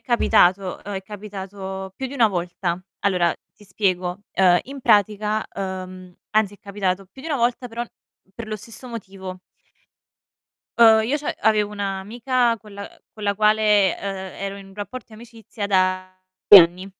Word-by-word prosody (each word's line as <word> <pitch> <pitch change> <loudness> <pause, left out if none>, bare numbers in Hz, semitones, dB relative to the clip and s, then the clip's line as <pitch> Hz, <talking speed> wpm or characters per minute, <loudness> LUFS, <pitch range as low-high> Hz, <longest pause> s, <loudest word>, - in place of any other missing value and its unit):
capitato, 195 -6 +2
uhm, 205 - -7
è 190 - -4
capitato 190 -1 -7
più 265 - -4
di 270 - -8
1 230 -5 +4
volta. 175 -1 -3 0.2
Allora 180 -4 +2 0.2
ti 210 - -21
spiego, 185 -2 -1
uhm, 180 -2 +5
in 275 +1 -9
pratica 210 -1 +2
uhm, 185 -2 -6
anzi 215 -2 +1
è - - -20
capitato 195 -1 -2
più 195 +8 -16
di 325 - -7
1 295 - 0
volta 245 0 0
però 235 +1 -4 0.5
per 230 +1 -7
lo 215 - -3
stesso 230 +4 -12
motivo. 190 -5 -8 1.4
Uhm, 220 -1 +7
io 270 +6 0
c'av 290 - -3
avevo 210 -1 +2
un'amica 225 +5 -1
con 210 0 -15
la 200 0 -7
ehm, - - -21
con 215 - -9
la 200 0 +1
quale, 210 -2 +3
ehm, 190 -1 -5
ero 195 0 -4
in 200 -1 -11
un 195 - -16
rapporto 210 +4 -7
di 220 - -14
amicizia 225 -2 -8
da 185 -1 +1 0.3
anni. 185 0 +8
200 Hz, 165 wpm, -22 LUFS, 190-220 Hz, 1.4 s, anni